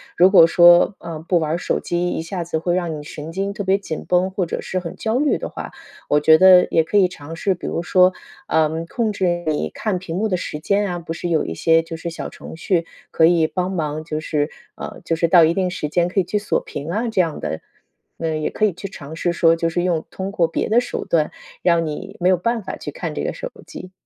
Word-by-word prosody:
如 185 Hz, +2 st, +5 dB
果 165 Hz, -4 st, +8 dB
说， 175 Hz, +3 st, +6 dB
呃， 165 Hz, -2 st, -7 dB
不 175 Hz, -, +3 dB
玩 155 Hz, -1 st, -2 dB
儿 165 Hz, -, 0 dB
手 -, -, -2 dB
机， 175 Hz, 0 st, -1 dB
一 -, -, -2 dB
下 175 Hz, +2 st, -5 dB
子 165 Hz, -1 st, -2 dB
会 175 Hz, +2 st, -1 dB
让 175 Hz, -3 st, -1 dB
你 150 Hz, -, -8 dB
神 150 Hz, +2 st, -8 dB
经 195 Hz, +2 st, -2 dB
特 200 Hz, 0 st, -5 dB
别 190 Hz, +1 st, +3 dB
紧 165 Hz, -6 st, -6 dB
绷， 180 Hz, +1 st, +2 dB
或 190 Hz, -2 st, -1 dB
者 170 Hz, -, -4 dB
是 185 Hz, -, -3 dB
很 175 Hz, -2 st, -7 dB
焦 225 Hz, +2 st, -1 dB
虑 295 Hz, +1 st, +2 dB
的 -, -, -5 dB
话。 -, -, -7 dB, 0.4 s
我 150 Hz, -, +2 dB
觉 160 Hz, +1 st, +7 dB
得 185 Hz, 0 st, +7 dB
也 160 Hz, -, +3 dB
可 185 Hz, -, -5 dB
以 190 Hz, -3 st, +5 dB
尝 165 Hz, -2 st, -9 dB
试， 190 Hz, +4 st, 0 dB
比 180 Hz, -, -7 dB
如 170 Hz, -, -2 dB
说， 185 Hz, +1 st, +4 dB, 0.3 s
呃， 160 Hz, +1 st, +1 dB
控 225 Hz, +1 st, -1 dB
制 175 Hz, -4 st, -1 dB
你 155 Hz, -1 st, -1 dB
看 200 Hz, -5 st, -2 dB
屏 170 Hz, -3 st, -6 dB
幕 215 Hz, +4 st, 0 dB
的 185 Hz, -, 0 dB
时 150 Hz, -, -5 dB
间 200 Hz, +4 st, +1 dB
啊， 175 Hz, -1 st, -3 dB
不 165 Hz, -, -8 dB
是 165 Hz, +1 st, -4 dB
有 165 Hz, -3 st, +1 dB
一 80 Hz, -, -4 dB
些 165 Hz, -, +3 dB
就 165 Hz, 0 st, -7 dB
是 170 Hz, -, -5 dB
小 170 Hz, -, -6 dB
程 -, -, -11 dB
序 170 Hz, 0 st, 0 dB, 0.3 s
可 160 Hz, -, +4 dB
以 165 Hz, -1 st, +4 dB
帮 180 Hz, +3 st, -2 dB
忙， 155 Hz, -2 st, -3 dB
就 155 Hz, -2 st, -3 dB
是 150 Hz, -1 st, -1 dB, 0.3 s
呃， -, -, -8 dB
就 165 Hz, -, -1 dB
是 170 Hz, -, +2 dB
到 170 Hz, 0 st, +6 dB
一 160 Hz, -, +4 dB
定 185 Hz, 0 st, 0 dB
时 165 Hz, -4 st, -4 dB
间 175 Hz, +2 st, +1 dB
可 190 Hz, +2 st, +1 dB
以 -, -, -2 dB
去 195 Hz, +4 st, -1 dB
锁 205 Hz, -, -1 dB
屏 145 Hz, +2 st, -7 dB
啊， 225 Hz, +7 st, -1 dB
这 220 Hz, -4 st, -2 dB
样 165 Hz, -4 st, 0 dB
的， 80 Hz, -, -3 dB, 0.6 s
那 165 Hz, -, -3 dB
也 155 Hz, 0 st, -1 dB
可 -, -, -4 dB
以 210 Hz, -, +4 dB
去 185 Hz, +3 st, -7 dB
尝 160 Hz, -4 st, -10 dB
试 175 Hz, 0 st, 0 dB
说， 165 Hz, -1 st, +4 dB
就 165 Hz, -, 0 dB
是 175 Hz, +1 st, -1 dB
用 170 Hz, -3 st, 0 dB
通 190 Hz, +1 st, -5 dB
过 170 Hz, -4 st, +2 dB
别 165 Hz, -, -2 dB
的 225 Hz, +3 st, +5 dB
手 245 Hz, -, -4 dB
段， 155 Hz, -3 st, +1 dB, 0.3 s
让 170 Hz, -2 st, +2 dB
你 160 Hz, +6 st, -6 dB
没 180 Hz, -, +4 dB
有 185 Hz, -, +4 dB
办 230 Hz, +4 st, -1 dB
法 -, -, -6 dB
去 -, -, -7 dB
看 -, -, -5 dB
这 -, -, -3 dB
个 -, -, -2 dB
手 -, -, -7 dB, 0.2 s
机。 185 Hz, -, -9 dB
175 Hz, 280 characters per minute, -20 LUFS, 160-190 Hz, 0.6 s, 果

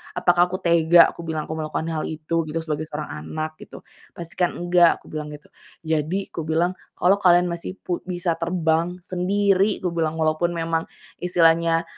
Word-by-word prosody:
apakah 175 Hz, 0 st, +3 dB
aku 185 Hz, -, -3 dB
tega," 170 Hz, -1 st, +5 dB
kubilang, 160 Hz, -2 st, -4 dB
"aku 160 Hz, -, -4 dB
melakukan 155 Hz, +1 st, -3 dB
hal 155 Hz, -1 st, -2 dB
itu 160 Hz, +1 st, -2 dB
gitu, 160 Hz, +2 st, -3 dB
sebagai 155 Hz, -1 st, -3 dB
seorang 150 Hz, 0 st, -6 dB, 0.2 s
anak 155 Hz, 0 st, -4 dB
gitu. -, -, -12 dB, 0.4 s
Pastikan 175 Hz, +1 st, -2 dB
enggak!" 175 Hz, -1 st, +4 dB
Kubilang 150 Hz, -1 st, -6 dB
gitu. 150 Hz, -, -16 dB, 0.4 s
Jadi 160 Hz, +5 st, -1 dB
kubilang, 165 Hz, +2 st, 0 dB, 0.3 s
"Kalau 180 Hz, +3 st, +4 dB
kalian 180 Hz, -2 st, +4 dB
masih 170 Hz, +2 st, -5 dB
pu 175 Hz, -1 st, -3 dB
bisa 175 Hz, -2 st, -2 dB
terbang 170 Hz, +1 st, 0 dB
sendiri," 195 Hz, +2 st, +1 dB
kubilang, 165 Hz, -3 st, -1 dB
"walaupun 160 Hz, +2 st, +1 dB
memang 165 Hz, 0 st, -1 dB, 0.4 s
istilahnya 165 Hz, -1 st, +3 dB
170 Hz, 150 wpm, -23 LUFS, 160-180 Hz, 0.4 s, tega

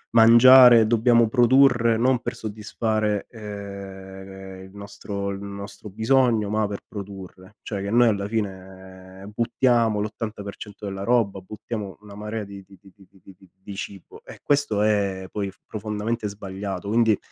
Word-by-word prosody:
mangiare, 120 Hz, 0 st, +8 dB
dobbiamo 115 Hz, 0 st, +4 dB
produrre 120 Hz, -1 st, +4 dB
non 125 Hz, +2 st, +2 dB
per -, -, -4 dB
soddisfare, 110 Hz, -1 st, -2 dB
ehm, 95 Hz, -2 st, -9 dB
il 95 Hz, -, -14 dB
nostro 100 Hz, 0 st, -6 dB
il 100 Hz, -, -6 dB
nostro 100 Hz, +1 st, -8 dB
bisogno, 110 Hz, 0 st, +2 dB
ma 105 Hz, 0 st, 0 dB
per 100 Hz, -1 st, -5 dB
produrre. 100 Hz, 0 st, -10 dB
Cioè 100 Hz, -3 st, -5 dB
che 100 Hz, -, -4 dB
noi 120 Hz, +1 st, +5 dB
alla 100 Hz, -2 st, 0 dB
fine 95 Hz, -2 st, -7 dB
buttiamo 115 Hz, -1 st, +1 dB
l'80% 105 Hz, -1 st, -7 dB
della 95 Hz, 0 st, -5 dB
roba, 115 Hz, -4 st, +1 dB
buttiamo 105 Hz, +1 st, -7 dB
una 100 Hz, -1 st, -13 dB
marea 105 Hz, 0 st, -5 dB
di 100 Hz, 0 st, -11 dB
di 95 Hz, 0 st, -18 dB
di 95 Hz, -, -18 dB
di 100 Hz, -, -20 dB
di 95 Hz, -2 st, -24 dB
di 95 Hz, -, -15 dB
di 95 Hz, -, -21 dB
di 100 Hz, -, -8 dB
cibo 95 Hz, -1 st, -9 dB
e -, -, -12 dB
questo 140 Hz, -8 st, +1 dB
è 100 Hz, -3 st, 0 dB
poi 100 Hz, -2 st, -3 dB, 0.2 s
profondamente 105 Hz, +1 st, -3 dB
sbagliato. 100 Hz, -1 st, -6 dB
Quindi, 110 Hz, -1 st, +3 dB
105 Hz, 150 wpm, -23 LUFS, 100-115 Hz, 0.2 s, mangiare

